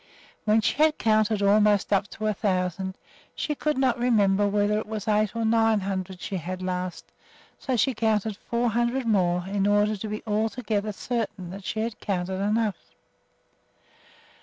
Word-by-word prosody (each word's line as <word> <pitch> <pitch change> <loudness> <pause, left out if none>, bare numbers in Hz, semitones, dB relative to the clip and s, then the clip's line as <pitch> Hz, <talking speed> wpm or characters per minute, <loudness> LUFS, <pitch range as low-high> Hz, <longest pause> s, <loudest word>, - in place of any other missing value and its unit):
When 215 +1 +4
she - - 0
had 310 -1 +4
counted 215 -1 +2
almost 205 0 +3
up 200 +1 +2
to 215 - -6
a 215 - +2
thousand, 190 -1 -1 0.4
she 300 - -2
could 300 0 -1
not 255 -2 +2
remember 205 -4 +3
whether 205 +1 +1
it 215 - -6
was 215 0 -5
eight 215 0 +1
or 230 -1 -1
nine 225 -1 +3
hundred 190 -1 -4
she 190 +2 -3
had 170 - -7
had 185 +1 -5
last, 180 -1 -4 0.5
so 260 - -1
she 265 +3 +2
counted 220 -2 0
four 235 +3 -1
hundred 240 +3 0
more 180 -5 +1
in 200 0 0
order 205 +1 +3
to 210 +2 -6
be 210 0 -5
altogether 215 0 -1
certain 205 -5 -4
that 195 +1 -9
she 220 - -2
had 225 0 -4
counted 190 -1 -2
enough. 210 0 -1
210 Hz, 170 wpm, -26 LUFS, 195-225 Hz, 0.5 s, When